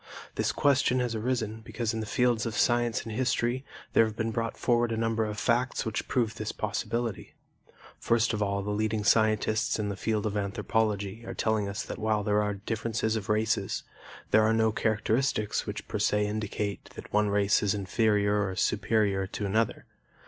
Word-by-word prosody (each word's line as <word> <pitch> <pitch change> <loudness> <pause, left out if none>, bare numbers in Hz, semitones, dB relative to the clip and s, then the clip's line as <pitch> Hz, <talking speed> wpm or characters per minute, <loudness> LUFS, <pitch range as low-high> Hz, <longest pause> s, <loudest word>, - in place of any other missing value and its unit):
This - - 0
question 140 -2 +2
has 120 -2 -1
arisen 110 -1 -2
because 115 0 -3
in 115 - -2
the 110 - -4
fields 120 -2 +1
of 115 - -4
science 120 -1 +2
and 115 - -7
history 120 +2 0 0.3
there - - +6
have 110 -1 -2
been 115 0 -1
brought 115 0 -2
forward 120 -1 +2
a 115 - -1
number 115 0 +1
of 105 -1 -4
facts 125 +3 +1
which 110 -1 -3
prove 115 -4 0
this - - -4
possibility. 115 -3 -3 0.6
First 115 0 +2
of 105 - -2
all, 100 -1 0
the 105 - -3
leading 110 0 0
scientists 110 +1 +2
in 105 -2 -2
the 100 - -3
field 105 +2 -1
of 105 -1 -1
anthropology 105 +1 -1
are - - -7
telling 110 -2 0
us 100 - -3
that - - -7
while 110 -1 +1
there 105 0 +2
are 105 -1 -1
differences 110 +1 -2
of 105 -3 -4
races, 110 0 0 0.5
there 110 - +6
are 110 +1 +3
no 110 0 +3
characteristics 110 +1 0
which - - -5
per - - -3
se 105 0 +2
indicate 105 -1 -3
that - - -10
one 105 0 +3
race 100 0 +3
is 105 -1 +1
inferior 105 0 +1
or 95 - -5
superior 100 -1 +1
to 105 - -4
another. 110 +3 0
110 Hz, 185 wpm, -28 LUFS, 105-115 Hz, 0.6 s, there